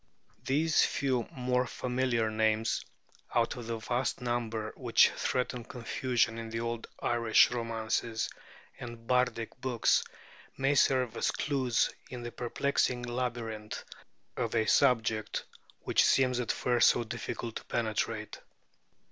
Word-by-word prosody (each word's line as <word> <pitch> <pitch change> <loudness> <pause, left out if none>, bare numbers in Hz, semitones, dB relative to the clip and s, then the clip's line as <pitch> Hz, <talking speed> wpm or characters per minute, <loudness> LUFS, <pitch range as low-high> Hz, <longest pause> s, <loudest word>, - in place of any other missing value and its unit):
These 155 +4 +3
few 130 -4 0
more 125 -1 0
familiar 125 -3 0
names, 110 +1 +1 0.5
out - - +2
of 120 -2 -7
the 115 -1 -2
vast 120 +4 -1
number 115 -3 -2
which - - +4
threaten 125 -1 -2
confusion 120 -1 -1
in 115 -1 -6
the 115 +1 -3
old 115 0 -3 0.2
Irish 115 -1 +4
romances 115 -1 -1 0.5
and 120 -1 -8
bardic 125 -1 0
books, 125 -3 +2 0.5
may 135 +2 +2
serve 130 -5 +3
as - - +1
clues 130 -5 +1 0.2
in 125 -1 -7
the 120 - -5
perplexing 125 0 0
labyrinth 120 -3 -4 0.5
of 115 0 -2
a 110 -1 +3
subject 110 -3 +2 0.4
which - - +3
seems 125 -2 +3
at 120 - 0
first 120 -1 +4
so - - +1
difficult 115 0 -5
to - - -10
penetrate. 110 -1 -2
120 Hz, 125 wpm, -31 LUFS, 115-125 Hz, 0.5 s, which